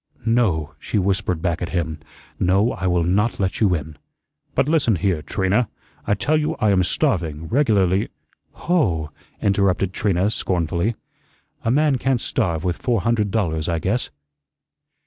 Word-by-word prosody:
"No," 95 -10 +1
she 105 - -2
whispered 95 -3 0
back 85 -3 0
at 90 - -2
him. 80 -4 -2 0.4
"No, 95 +6 +3
I 95 - -3
will 90 -1 +2
not 100 +7 +1
let 95 -2 -1
you 100 -5 +3
in." 75 -2 -7 0.6
"But - - +2
listen 150 -9 +3
here, 90 -3 0
Trina, 95 +8 0 0.4
I 105 - +3
tell 150 +9 +1
you 150 - -1
I 105 - +2
am 95 -2 +3
starving, 80 -2 -1
regularly 100 -8 +2 0.2
" - - -42
"Hoh!" 90 - +1 0.3
interrupted 95 -2 +2
Trina 100 0 +1
scornfully. 90 +3 -1 0.7
"A - - 0
man 140 +1 +3
can't 135 -1 +1
starve 85 -7 -1
with 90 -2 -1
four 120 -5 +1
hundred 110 -1 +1
dollars, 85 -7 -1
I 85 - 0
guess." 100 +9 -1
95 Hz, 155 wpm, -22 LUFS, 85-115 Hz, 0.7 s, No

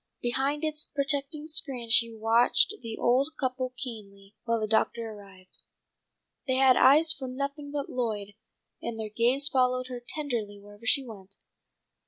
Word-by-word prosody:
Behind 270 +5 -1
its 305 -1 -2
protecting 285 +1 0
screen 270 -7 0
she 230 0 +6
watched 225 - +3
the 225 -2 -6
old 255 +4 +2
couple 255 -1 -2
keenly, 205 -6 -8
when 230 -1 0
the 215 - -1
doctor 225 +1 0
arrived. 195 -3 -13 0.9
They 260 - +1
had 260 -1 +5
eyes 315 +4 +5
for 265 -3 -7
nothing 280 +3 -5
but 285 -1 -3
Lloyd, 215 -5 -3 0.5
and 230 -1 -5
their 215 -1 -4
gaze 245 +6 +2
followed 255 -2 +1
her 245 -1 -6
tenderly 235 -9 -3
wherever 205 +2 -13
she 275 +4 +3
went. 200 -4 -11
250 Hz, 150 wpm, -28 LUFS, 220-275 Hz, 0.9 s, she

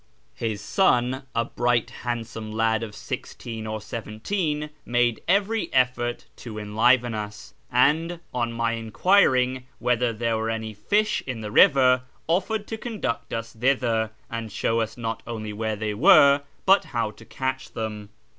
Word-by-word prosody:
His 110 -3 -3
sou, 125 - +2
a 115 0 +2
Itright 120 -1 0
handsome 115 -2 -4
lad 110 0 +1
of 110 -2 -6
sixteen 110 +1 -6
or 110 0 -3
seventeen, 150 - -3
made 120 -1 +1
every 200 +4 +2
eflbrt 125 -2 0
to 110 -3 -8
enliven 115 +3 +2
us, 105 -1 -6 0.2
and, 160 +6 +2
on 120 -2 -1
my 115 0 0
enquiring 125 - +2
whether 125 0 +1
there 115 0 -1
were 110 0 -2
any 110 -1 -3
fisli 210 - +1
in 125 -4 -4
the 105 -1 -5
river, 130 0 +6 0.3
offered 200 +5 0
to 225 - -4
conduct 130 - -3
us 115 0 -4
thither, 115 -2 +1 0.2
and 115 -2 -5
show 115 +3 +1
ns 110 - -7
not 115 -1 -3
only 110 -2 -5
where 110 +1 -2
they 105 0 -2
were, 140 +6 +6 0.2
but 195 +1 +5
how 115 -4 -2
to 105 - -16
catch 130 0 -4
them. 105 -2 -5
115 Hz, 150 wpm, -25 LUFS, 110-130 Hz, 0.3 s, river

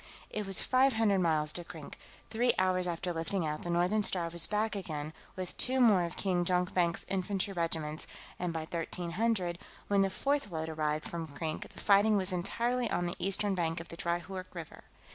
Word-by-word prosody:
It 210 -2 -3
was 195 - +3
five 260 +1 +4
hundred 220 -3 +3
miles 155 -3 +2
to 175 - -3
Krink; 160 -3 -9 0.4
three 240 +2 +3
hours 185 -1 +2
after 175 +1 -2
lifting 165 +2 -1
out, 150 0 -2
the 175 - -5
Northern 180 +5 +2
Star 175 -4 +1
was 170 0 +6
back 215 +1 0
again, 155 -5 -4 0.2
with 185 -1 -5
two 260 +1 +1
more 210 -8 +5
of 170 - -7
King 180 -3 +1
Jonkvank's 180 -1 +1
infantry 195 +1 -1
regiments, 160 -3 -2 0.3
and 180 -1 -1
by 165 -1 -3
1300, 175 +3 -1 0.3
when 200 -1 +4
the 195 - +3
fourth 280 +4 0
load 160 -2 -3
arrived 155 -1 -1
from 165 -1 -4
Krink, 155 +2 -4
the - - -11
fighting 205 +1 +5
was 190 -1 +1
entirely 235 +7 0
on 175 - 0
the 175 - -2
eastern 195 +1 +1
bank 165 -2 0
of 170 - -9
the - - -7
dry 170 +1 -1
Hoork 185 +1 -8
River. 165 -3 -8
180 Hz, 195 wpm, -32 LUFS, 165-200 Hz, 0.4 s, was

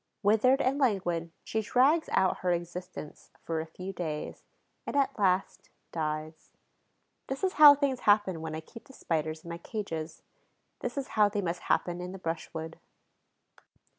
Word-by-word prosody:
Withered 225 +7 +4
and 270 +3 +1
languid, 175 - 0
she 220 - -1
drags 265 +9 +3
out 190 - +2
her 180 - 0
existence 175 -2 -5
for 165 -1 -2
a 160 - -7
few 185 +4 -7
days 160 -4 -5 0.4
and, - - -3
at 275 -3 +1
last, 190 -1 +1 0.2
dies. 155 0 -4 0.8
This 270 +5 -4
is 375 - +1
how 290 -1 +12
things 275 -3 0
happen 205 -5 +3
when 160 -1 -4
I 160 - -5
keep 230 +8 -13
the 270 - -16
Spiders 155 - -2
in 170 - -8
my 170 - -6
cages; 165 -6 -5 0.6
this 245 +2 -4
is 275 - -3
how 210 -1 +4
they 205 0 -2
must 175 0 -2
happen 175 0 +1
in 180 +1 -6
the - - -6
brushwood. 165 -2 -5
185 Hz, 165 wpm, -29 LUFS, 165-230 Hz, 0.8 s, how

